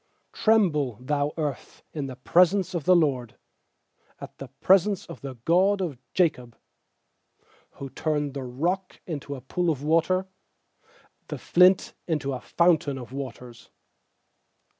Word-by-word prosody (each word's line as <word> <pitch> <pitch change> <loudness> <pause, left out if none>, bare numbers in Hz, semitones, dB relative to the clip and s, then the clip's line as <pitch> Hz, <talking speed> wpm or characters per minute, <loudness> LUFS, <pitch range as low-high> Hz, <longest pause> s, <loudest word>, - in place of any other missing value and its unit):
7Tremble, 150 - +1
thou 145 +1 0
earth, 150 -5 -5
at 145 -3 -3
the 130 - -7
pres 180 +8 +4
ence 190 -2 -2
of 170 -5 -3
the 185 - +6
Lord, 135 -8 +1 0.8
At - - -10
the 135 - -7
presence 190 - +2
of 170 - -11
the 135 -2 -7
God 190 +4 +3
of 160 -10 -3 0.2
Jacob; 125 -10 0 1.2
8Who 135 -2 -8
turned 150 -2 -1
the 140 - -5
rock 170 +10 -3
into 145 -4 -5
a 130 - -9
pool 175 +7 -1
of 145 -3 -2
water, 165 +4 +2 1.0
The - - -5
flint 180 +1 +4
into 150 -5 -1
a 125 - -5
fountain 160 -5 +2
of 125 0 -9
waters. 125 -3 -8
150 Hz, 140 wpm, -26 LUFS, 135-180 Hz, 1.2 s, the